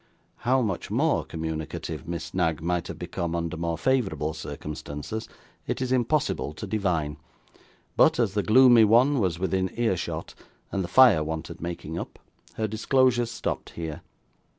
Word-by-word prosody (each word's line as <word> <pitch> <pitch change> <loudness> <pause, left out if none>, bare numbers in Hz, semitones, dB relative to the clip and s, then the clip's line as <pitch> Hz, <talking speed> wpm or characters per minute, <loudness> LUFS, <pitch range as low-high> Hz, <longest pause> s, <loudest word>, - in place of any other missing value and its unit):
How 130 +1 +2
much 95 -6 -3
more - - +1
communicative 80 0 -5
Miss 85 0 -5
Knag 80 -4 +1
might 85 +1 -1
have - - -7
become 85 -1 -3
under 85 -1 -2
more 85 0 -2
favourable 95 - 0
circumstances, 75 +5 -6 0.4
it - - -2
is 130 -1 -2
impossible 130 - +1
to 80 - -7
divine, 90 -8 -1 0.8
but - - +5
as 110 -5 +1
the 105 - +1
gloomy 120 +2 +7
one 125 +6 +5
was 90 -6 0
within 95 +1 0
ear 115 -5 +1
shot, - - -5 0.4
and 95 - -1
the - - -4
fire 105 -4 +6
wanted 80 +1 -5
making 85 -1 -5
up, - - -7 0.4
her 110 - -1
disclosures 120 +2 +2
stopped 120 - -4
here. 80 -1 -5
95 Hz, 150 wpm, -26 LUFS, 80-115 Hz, 0.8 s, gloomy